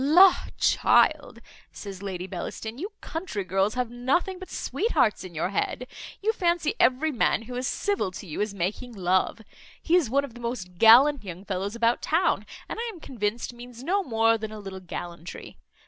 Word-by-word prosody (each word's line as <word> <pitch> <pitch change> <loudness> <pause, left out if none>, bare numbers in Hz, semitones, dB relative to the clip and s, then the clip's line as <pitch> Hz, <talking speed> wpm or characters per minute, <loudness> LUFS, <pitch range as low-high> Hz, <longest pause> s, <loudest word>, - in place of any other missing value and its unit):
"La! 355 +7 +8 0.2
child," - - +3 0.3
says 195 -2 -8
Lady 185 -3 -4
Bellaston, 220 +5 -6
"you 395 +7 -4
country 320 - -4
girls 195 +3 0
have 250 -2 -1
nothing 280 +10 0
but 375 - -9
sweethearts 305 - 0
in 180 -3 -10
your 165 +3 -1
head; 205 +5 -2 0.4
you 440 +2 +2
fancy 345 -6 +1
every 275 +5 +3
man 230 -3 +1
who 250 +2 -9
is 250 +1 -2
civil 405 - 0
to 195 - -8
you 165 +2 -4
is 210 0 0
making 200 +6 -3
love. 185 +2 +1 0.4
He 340 - +2
is 335 -10 +3
one 280 +3 +2
of 255 - -13
the 240 - -11
most 190 -7 -5
gallant 260 +5 +7
young 185 0 -8
fellows 195 +2 -3
about 235 0 +2
town, 335 +4 +1 0.2
and - - -5
I 470 0 -2
am 365 - -12
convinced 235 -4 -3
means 240 0 -11
no 385 +7 +1
more 225 - +2
than 215 0 -5
a 215 - -7
little 195 -2 -7
gallantry. 175 -1 -8
235 Hz, 185 wpm, -26 LUFS, 195-295 Hz, 0.4 s, La